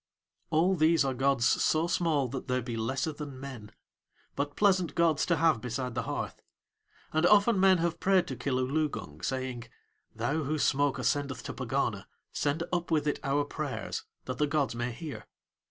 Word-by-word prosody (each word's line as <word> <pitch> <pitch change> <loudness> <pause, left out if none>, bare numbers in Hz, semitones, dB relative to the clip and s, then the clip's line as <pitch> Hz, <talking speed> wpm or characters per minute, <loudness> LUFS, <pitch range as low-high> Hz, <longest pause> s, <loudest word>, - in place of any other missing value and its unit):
All 170 +5 +3
these 160 -3 +4
are 135 - 0
gods 135 -1 +2
so 155 +5 +3
small 165 -6 +1
that 135 +2 -5
they 125 0 +1
be 120 -1 -4
lesser 130 +7 -1
than 145 -3 -7
men, 125 -6 -8 0.6
but 145 0 -2
pleasant 185 -6 +2
gods 165 -3 +2
to 170 - +3
have 160 -7 +3
beside 125 +1 -3
the 120 - -1
hearth; - - -4 0.7
and 155 +1 +2
often 210 +1 +5
men 190 -1 +6
have 170 0 -1
prayed 190 -2 +3
to 130 - -3
Kilooloogung, 130 - -2
saying: 130 0 -3 0.5
"Thou 160 +3 -1
whose 155 +1 -1
smoke 145 0 +2
ascendeth 140 -3 -1
to - - -5
Pegana - - -2 0.3
send 145 +4 0
up 175 -1 -1
with 155 -3 +1
it 145 - 0
our 145 +1 +1
prayers, - - -4 0.2
that - - -5
the 150 - +3
gods 140 -3 0
may 120 +1 -2
hear." 150 +4 -8
145 Hz, 170 wpm, -30 LUFS, 130-165 Hz, 0.7 s, men